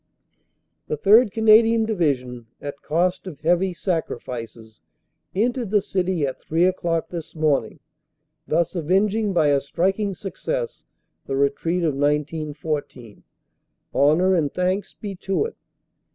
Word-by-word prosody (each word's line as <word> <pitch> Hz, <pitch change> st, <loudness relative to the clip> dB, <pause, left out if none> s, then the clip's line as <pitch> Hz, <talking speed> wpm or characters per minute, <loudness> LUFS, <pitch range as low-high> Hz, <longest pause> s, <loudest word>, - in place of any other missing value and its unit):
"The 150 Hz, -, -2 dB
3rd. 210 Hz, -, +5 dB
Canadian 225 Hz, +1 st, +5 dB
Division, 130 Hz, -, -1 dB
at 140 Hz, -1 st, -7 dB
cost 180 Hz, +4 st, 0 dB
of 155 Hz, -5 st, -9 dB
heavy 175 Hz, +4 st, +2 dB
sacrifices, 120 Hz, -, -5 dB, 0.5 s
entered 235 Hz, +2 st, 0 dB
the 210 Hz, +1 st, +4 dB
city 185 Hz, -5 st, -1 dB
at 130 Hz, -, -5 dB
three 165 Hz, +3 st, +1 dB
o 185 Hz, -, +3 dB
clock 165 Hz, -3 st, -2 dB
this 170 Hz, -2 st, -7 dB
morning, 155 Hz, -3 st, 0 dB, 0.7 s
thus 170 Hz, +1 st, +1 dB
avenging 195 Hz, +5 st, +1 dB
by 160 Hz, -5 st, +3 dB
a 140 Hz, -1 st, +3 dB
striking 195 Hz, +7 st, -1 dB
success 480 Hz, -, -4 dB, 0.4 s
the 135 Hz, -, -2 dB
retreat 145 Hz, +6 st, 0 dB
of 155 Hz, -3 st, +1 dB
1914. 145 Hz, -4 st, -2 dB, 0.7 s
Honor 160 Hz, +7 st, +4 dB
and 155 Hz, -6 st, +1 dB
thanks 185 Hz, +2 st, -1 dB
be 205 Hz, -2 st, -6 dB
to 195 Hz, -, -1 dB
it! 465 Hz, -, -6 dB
170 Hz, 125 wpm, -23 LUFS, 145-195 Hz, 0.7 s, 3rd